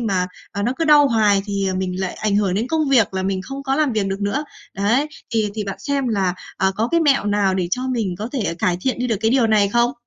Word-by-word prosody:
mà, 190 -6 0 0.3
à, 200 - -3
nó 240 - +1
cứ 330 - +1
đau 295 -2 +6
hoài 210 -3 +3
thì, 200 -1 -1
à, 185 - -2
mình 185 0 -3
lại 190 -1 -2
ảnh 210 -2 0
hưởng 200 -3 +1
đến 220 +5 -1
công 310 0 0
việc 230 -8 +3
là 190 - -1
mình 190 0 -2
không 270 +4 -7
có 270 -1 0
làm 295 -4 +1
việc 210 -3 0
được 195 +1 -3
nữa. 235 +10 -1 0.3
Đấy, 230 +9 +1 0.2
thì 220 -3 0
thì 215 -2 -3
bạn 195 - -5
xem 280 -3 -1
là, 190 -4 0 0.2
à, 190 0 +2
có 225 +3 0
cái 335 - +2
mẹo 285 -8 +3
nào 205 -2 +1
để 180 -2 -1
cho 250 - -1
mình 225 -8 -1
có 215 +3 -4
thể, 265 - -2
à, - - -1
cải 175 0 +1
thiện 255 +5 -1
đi 250 - -1
được 225 - 0
cái 225 - +2
điều 250 -2 +3
này 210 -2 +3
không? 240 +3 +2
215 Hz, 285 wpm, -20 LUFS, 195-255 Hz, 0.3 s, đau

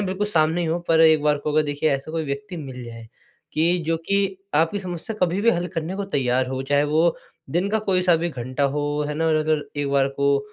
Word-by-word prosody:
बिल्कुल 190 +3 -1
सामने 165 -3 +2
ही 170 - -1
हो 165 +2 0
पर 160 -1 +4
एक 160 -2 +6
बार 150 -1 +2
को 150 +1 -3
वो 155 - +4
देखिए 145 +1 0
ऐसा 140 +2 -2
कोई 160 -1 -2
व्यक्ति 140 +5 -5
मिल 130 -5 -7
जाए, 115 -1 -10 0.5
कि 170 +3 +2
जो 165 0 +1
कि 195 -1 +1 0.2
आपकी 165 +6 +2
समस्या 185 +3 -5
कभी-भी 190 +6 +3
हल 175 -4 -1
करने 165 +3 -2
को 200 - -3
तैयार 130 -1 +1
हो, 130 0 -3
चाहे 145 +1 +2
वो 160 +3 +2 0.3
दिन 175 +6 0
का 220 - +2
कोई-सा 185 -4 +2
भी 170 +1 -1
घंटा 130 0 -4
हो, 145 +1 -1
है 150 - -3
ना? 160 +2 0
और 160 - +3
अगर 155 -1 +1
एक 145 -1 -1
बार 140 -1 +3
को, 140 0 +1
155 Hz, 235 wpm, -23 LUFS, 140-175 Hz, 0.5 s, एक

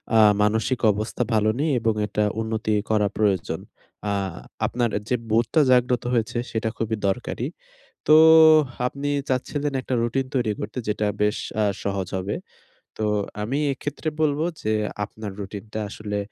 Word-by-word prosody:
আ - - +7 0.2
মানসিক 110 +4 +1
অবস্থা 110 +4 -2
ভালো 110 0 +3
নেই 155 +1 +1
এবং 115 -1 +1
এটা 105 +1 0 0.2
উন্নতি 110 -1 -1 0.2
করা 105 -2 +3
প্রয়োজন। 100 -5 +1 0.5
আ - - +1 0.5
আপনার 120 -1 0 0.2
যে, 125 - +3 0.2
বোধটা 115 +8 +3
জাগ্রত 125 -1 +3
হয়েছে 120 0 0
সেটা 110 0 -1
খুবই 115 0 -1
দরকারি। 95 - -2 0.6
তো 150 - +7 0.7
আপনি 140 +2 -3 0.2
চাচ্ছিলেন 145 +3 -1
একটা 130 - -3
routine 130 +3 -1
তৈরি 120 -5 +1
করতে - - -5
যেটা 105 0 0
বেশ 105 0 +2 0.3
আ - - +3 0.2
সহজ 95 -2 -2
হবে। 95 +2 -2 0.6
তো 110 - -1 0.4
আমি 125 +7 -1
এক্ষেত্রে 145 +3 -4
বলব 150 -1 +2 0.2
যে, 110 - 0 0.3
আপনার 105 0 -7
routine 100 +1 -7
টা 110 - -3
আসলে 105 -1 -4
110 Hz, 145 wpm, -24 LUFS, 105-125 Hz, 0.7 s, আ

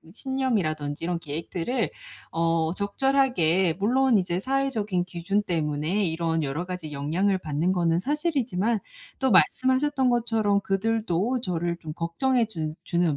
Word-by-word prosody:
그 165 - -17
신념이라든지 195 - -1
이런 175 0 -1
계획들을 170 - -3 0.4
어 165 0 +1
적절하게 200 - +2
물론 255 +3 +3
이제 180 -2 -1
사회적인 220 -6 0
기준 185 +3 -1
때문에 160 +2 -1
이런 165 -1 0
여러 145 +5 -2
가지 180 -4 -6
영향을 170 +8 0
받는 160 +2 0
거는 170 -2 +2
사실이지만 245 - 0 0.4
또 265 -3 +2
말씀하셨던 260 +6 +3
것처럼 225 -4 +2
그들도 215 +3 0
저를 175 -4 -2
좀 155 -2 -6
걱정해 225 +9 +1
주 160 -7 -4
주는 170 -4 +1
185 Hz, 320 characters per minute, -26 LUFS, 165-235 Hz, 0.4 s, 물론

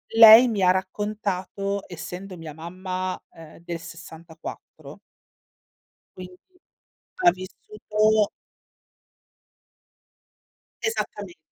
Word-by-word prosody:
lei, 225 +2 +10
mi 215 -4 -1
ha 180 - +5
raccontato, 200 +1 -2
essendo 180 +2 -8
mia 160 -2 -8
mamma, 185 +3 -5
ehm, 165 -1 -14
del 170 -1 -5
'64 165 0 -11 1.2
quindi 180 0 -10 0.8
ha 355 - +7
vissuto 210 +2 0 2.5
Esattamente. 210 -4 -4
185 Hz, 75 wpm, -24 LUFS, 180-210 Hz, 2.5 s, lei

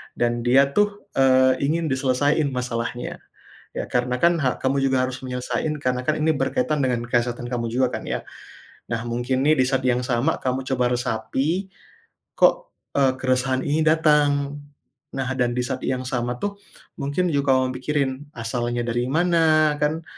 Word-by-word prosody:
dan 120 0 0
dia 135 +3 +4
tuh, 205 0 +1
eee, 130 -1 +4
ingin 165 +3 0
diselesaiin 140 +3 +1
masalahnya 120 -1 -4 0.6
ya - - -2
karena 125 0 0
kan 170 0 +4
hak 130 -5 -1
kamu 135 +1 +1
juga 130 -1 +2
harus 130 0 -4
menyelesaiin 125 +4 -2
karena 125 -1 0
kan 155 - +2
ini 160 +1 +2
berkaitan 245 - 0
dengan 125 -2 0
kesehatan 120 0 0
kamu 120 -1 -1
juga 130 0 +2
kan - - -11
ya. - - -3 0.7
Nah 115 -1 -1
mungkin 120 +3 -1
nih 155 +1 +5
di 130 - +4
saat 135 -1 0
yang 125 0 +2
sama 125 +5 0
kamu 130 0 -2
coba 125 -1 +1
resapi 135 - -1 0.7
kok, - - +3 0.2
eee, 135 -2 +4
keresahan 130 0 +1
ini 150 +2 +1
datang? 145 -3 +3 0.6
Nah 135 -1 -2
dan 120 -1 +1
di 125 - 0
saat 125 - -3
yang 130 -1 -1
sama 125 -1 -2
tuh 200 0 -3 0.4
mungkin 145 +6 -1
juga 140 -3 +2
kamu 130 0 +1
pikirin 140 0 0 0.2
asalnya 120 +1 -2
dari 120 +1 -1
mana 155 0 +3
kan, 155 +2 0
130 Hz, 165 wpm, -23 LUFS, 125-150 Hz, 0.7 s, nih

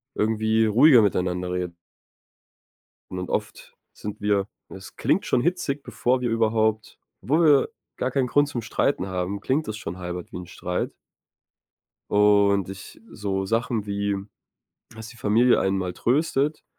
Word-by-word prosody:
irgendwie 110 +1 +2
ruhiger 120 +4 +6
miteinander 90 -3 0
reden. 90 -1 -3 1.4
Und 90 - -5
dann 90 - -5
oft - - -4 0.2
sind 105 -1 -7
wir 100 -1 +1 0.2
es 95 0 -11
klingt 195 - +1
schon 125 - +2
hitzig 145 -4 -1
bevor 125 +1 0
wir 125 - -1
überhaupt 110 -1 0 0.2
obwohl 155 +6 +2
wir, 145 -2 +6
äh, - - -5 0.3
gar 130 - -1
keinen 135 -1 +1
Grund 145 +3 +2
zum 125 -5 -4
Streiten 110 -1 0
haben, 95 +1 -3
klingt 135 +8 -1
das 110 - -4
schon 90 -4 -6
halb 90 -1 -6
wie - - -7
'n 90 0 -7
Streit 90 0 -3 1.2
und 100 -2 +4
ich 95 0 -9
äh, - - -19
so 95 -2 -2
Sachen 115 0 -1
wie, 100 0 -1 0.8
das 110 0 -9
die 115 - -13
Familie 115 +3 +3
einen 95 0 +1
mal 90 -1 -3
tröstet. 145 - 0
105 Hz, 155 wpm, -24 LUFS, 95-125 Hz, 1.4 s, ruhiger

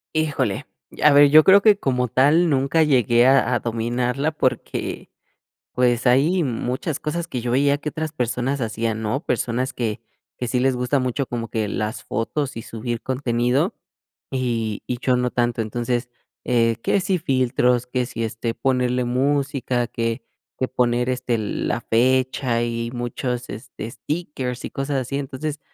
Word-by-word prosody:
Híjole, 155 -2 -1 0.2
y - - -11
a 150 - +7
ver, 145 0 +7
yo 155 0 +8
creo 200 +1 +7
que 210 -2 +5
como 125 -2 0
tal 145 +8 +4
nunca 140 +2 +2
llegué 120 -4 +4
a 130 -2 +4
a - - +1
dominarla 120 +5 -1
porque, 130 -4 -2 0.6
pues, 125 0 +2
hay 155 +8 +3
muchas 130 +4 -2
cosas 170 +3 -3
que 125 - -3
yo 120 0 -2
veía 140 +2 +3
que 150 +1 -4
otras 155 -1 -4
personas 125 0 -1
hacían, 110 0 -2
¿no? 110 +6 -1
Personas 125 +2 -1
que, 115 -1 -3 0.4
que 125 - -4
sí 125 - 0
les 130 0 +2
gusta 125 +3 0
mucho 130 +1 -1
como 115 -1 -4
que 110 -3 -2
las 110 +2 -3
fotos 130 +3 -3
y 115 - -5
subir 115 0 -4
contenido, 125 -1 0 0.6
y 115 -5 -2
y 125 -1 -3
yo 125 -1 +2
no 125 0 0
tanto. 120 -1 0
Entonces, 120 +2 -2 0.4
eh, 115 -2 +2
que 200 - +1
si 185 0 +1
filtros, 125 -4 +1
que 125 0 -1
si, 115 -2 -4
este, 115 +1 -3
ponerle 125 -1 0
música, 130 -1 0
que 115 +2 -3 0.3
que 130 - -1
poner 125 0 +1
este 125 -2 -1
la 110 +2 -2
fecha 125 0 +1
y 115 0 -2
muchos 120 +1 -3
este, 110 +1 -7
stickers 130 -2 -4
y - - -7
cosas 135 +1 -3
así. 140 +3 -3
Entonces, 145 +2 -4
125 Hz, 165 wpm, -22 LUFS, 120-140 Hz, 0.6 s, yo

